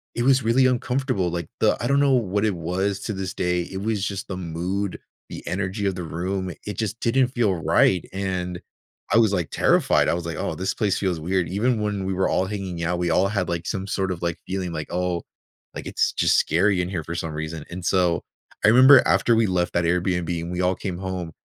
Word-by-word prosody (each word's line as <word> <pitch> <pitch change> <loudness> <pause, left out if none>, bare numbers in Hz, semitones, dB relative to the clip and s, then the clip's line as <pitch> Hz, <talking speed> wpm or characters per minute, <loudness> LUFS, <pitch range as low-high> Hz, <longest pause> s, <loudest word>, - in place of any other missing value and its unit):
it 120 - 0
was 130 -2 +4
really 120 +4 +3
uncomfortable. 125 -5 0
Like, 85 -1 -3
the - - +3
I - - -1
don't 140 0 +3
know 140 -1 +4
what 105 -4 +1
it 105 -4 +1
was 95 +4 -2
to 110 - -3
this 95 -1 -4
day. 90 0 0
It 95 +2 -6
was 105 -2 -1
just 100 -2 -4
the 95 - -5
mood, 90 +3 -3 0.3
the - - -8
energy 100 +2 -2
of 95 - -1
the 90 - -5
room. 90 +3 -3
It 105 -3 -5
just 110 0 -3
didn't 130 +2 +2
feel 120 -6 +1
right. 90 +2 +2
And, 90 -2 -3 0.5
I 110 - +6
was, 110 -3 +4
like, 90 -5 -1
terrified. - - +3
I - - +2
was, 85 0 -3
like, 85 - -4
"Oh, - - -2
this 95 +1 -2
place 100 -3 0
feels 90 -4 -1
weird." 90 +1 -1
Even 110 +4 0
when 105 -2 -2
we 95 - -1
were 95 +1 +1
all 95 - +1
hanging 95 -4 -4
out, 85 +1 -1
we 90 - 0
all 90 +4 +3
had, 100 -4 -1
like, 85 0 -3
some 95 -2 -3
sort 95 -1 -1
of, 85 - -5
like, 85 -1 -1
feeling 95 -2 -3
like, 75 -1 -4
"Oh, 90 -1 -1 0.5
like, - - -6
it's - - 0
just - - +3
scary 90 +4 +2
in 90 - -3
here 90 -4 -3
for 85 +2 -6
some 80 -1 -3
reason." 80 0 -5
And 90 0 -6
so, 90 -3 +2 0.4
I - - +7
remember 130 +3 +8
after 115 - +3
we 110 -2 +3
left 90 -1 0
that 85 - +1
Airbnb 90 -1 0
and 85 - -5
we 90 0 -2
all 90 +1 +2
came 90 -2 -5
home, 95 -3 -4
95 Hz, 235 wpm, -23 LUFS, 90-105 Hz, 0.5 s, remember